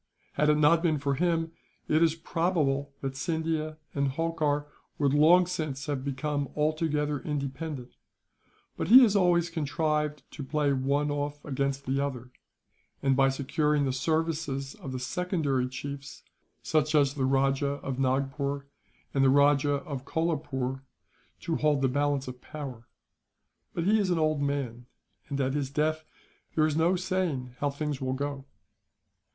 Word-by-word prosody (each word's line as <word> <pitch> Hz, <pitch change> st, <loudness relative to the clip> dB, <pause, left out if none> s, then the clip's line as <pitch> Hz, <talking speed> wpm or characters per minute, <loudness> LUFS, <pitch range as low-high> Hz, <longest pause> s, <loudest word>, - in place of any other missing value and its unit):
Had 150 Hz, +1 st, +2 dB
it 150 Hz, -, +4 dB
not 155 Hz, +2 st, +5 dB
been 165 Hz, -3 st, +2 dB
for 140 Hz, 0 st, 0 dB
him, 165 Hz, +2 st, 0 dB, 0.4 s
it 155 Hz, +1 st, +3 dB
is 165 Hz, -1 st, +4 dB
probable 160 Hz, -5 st, 0 dB
that 135 Hz, -1 st, -3 dB
Scindia 160 Hz, 0 st, -2 dB, 0.2 s
and 140 Hz, -1 st, +1 dB
Holkar 150 Hz, 0 st, 0 dB, 0.3 s
would 140 Hz, -2 st, +2 dB
long 165 Hz, +5 st, +6 dB
since 155 Hz, -6 st, -3 dB
have 140 Hz, -3 st, -2 dB
become 140 Hz, +1 st, -2 dB
altogether 150 Hz, -1 st, 0 dB
independent; 140 Hz, -1 st, -4 dB, 0.8 s
but -, -, -3 dB
he 255 Hz, +6 st, +10 dB
has 210 Hz, -4 st, +4 dB
always 175 Hz, -3 st, +3 dB
contrived 150 Hz, -1 st, -1 dB
to 145 Hz, -, -7 dB
play 145 Hz, +1 st, +1 dB
one 140 Hz, +2 st, +1 dB
off 145 Hz, 0 st, -3 dB
against 140 Hz, 0 st, -2 dB
the 135 Hz, +1 st, 0 dB
other 130 Hz, -3 st, -3 dB, 0.7 s
and, 135 Hz, -1 st, +3 dB
by 135 Hz, +1 st, +4 dB
securing 145 Hz, +2 st, +1 dB
the 130 Hz, -, 0 dB
services 150 Hz, -1 st, -1 dB
of 135 Hz, -, -8 dB
the 130 Hz, -, -3 dB
secondary 140 Hz, -2 st, -1 dB
chiefs, 140 Hz, +2 st, -7 dB, 0.4 s
such 155 Hz, 0 st, +1 dB
as 140 Hz, -2 st, +4 dB
the 135 Hz, -3 st, -1 dB
Rajah 135 Hz, +1 st, +1 dB
of 135 Hz, -1 st, -3 dB
Nagpore 140 Hz, +1 st, -1 dB, 0.5 s
and 135 Hz, -, +3 dB
the 135 Hz, -, +6 dB
Rajah 145 Hz, 0 st, +3 dB
of 135 Hz, -3 st, -5 dB
Kolapoore, 140 Hz, -5 st, -2 dB, 0.6 s
to 165 Hz, -, -1 dB
hold 150 Hz, -2 st, +2 dB
the -, -, +5 dB
balance 145 Hz, 0 st, 0 dB
of 125 Hz, 0 st, -8 dB
power; 135 Hz, -6 st, -8 dB, 0.9 s
but 170 Hz, -, -1 dB
he 215 Hz, +4 st, +4 dB
is 200 Hz, -3 st, +1 dB
an 175 Hz, -, +2 dB
old 155 Hz, -2 st, +1 dB
man, 130 Hz, -4 st, -2 dB, 0.4 s
and 140 Hz, -1 st, -2 dB
at 135 Hz, -1 st, +1 dB
his 140 Hz, -2 st, -1 dB
death 155 Hz, +2 st, 0 dB, 0.5 s
there 155 Hz, -, +4 dB
is 155 Hz, -1 st, 0 dB
no 165 Hz, +3 st, +3 dB
saying 180 Hz, -9 st, -2 dB
how 145 Hz, -, +1 dB
things 145 Hz, -1 st, -3 dB
will 130 Hz, 0 st, -1 dB
go. 140 Hz, 0 st, -4 dB
145 Hz, 155 wpm, -28 LUFS, 135-155 Hz, 0.9 s, he